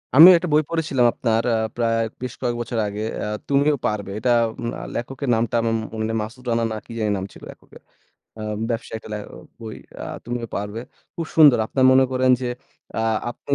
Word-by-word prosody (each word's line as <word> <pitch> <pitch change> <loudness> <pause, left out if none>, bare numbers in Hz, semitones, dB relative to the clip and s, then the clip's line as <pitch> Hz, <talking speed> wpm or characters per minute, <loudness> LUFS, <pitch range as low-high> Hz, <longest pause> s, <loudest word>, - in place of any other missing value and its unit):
আমিও 170 +6 +11
একটা 170 0 -3
বই 155 - +5
পড়েছিলাম 155 -7 +1
আপনার 115 -1 0
আ - - +2 0.2
প্রায় 115 -1 +1 0.2
বেশ 125 -1 -4
কয়েক 120 -2 0
বছর 115 0 -3
আগে। 105 +1 -5 0.2
অ্যা - - -3 0.2
"তুমিও 140 +2 +3
পারবে।" 100 -2 -2
এটা 120 +2 +1 0.5
আ - - -7
লেখকের 135 +2 -4
নামটা 115 0 0
আমার 115 0 0 0.2
মনে 110 0 -2
নেই - - -2
মাসুদ 120 +4 -8
রানা, 115 0 +1
না - - -3
কি - - -13
জানি 105 -1 0
নাম 95 - -4
ছিল - - -15
লেখকের। - - -17 0.6
অ্যা 110 - -7 0.3
ব্যবসায়ীর 115 -1 -4
টালে 105 -1 -5 0.4
বই 110 -1 -7 0.3
আ - - -4 0.2
তুমিও 120 -1 -4
পারবে। 105 +3 -4 0.3
খুব 165 - -4
সুন্দর, 145 -7 +8
আপনারা 130 +2 +1
মনে 130 0 +6
করেন 130 0 +3
যে 125 - -2 0.5
আ - - -1 0.3
আপনি 140 +3 -3
120 Hz, 195 wpm, -22 LUFS, 110-135 Hz, 0.6 s, আমিও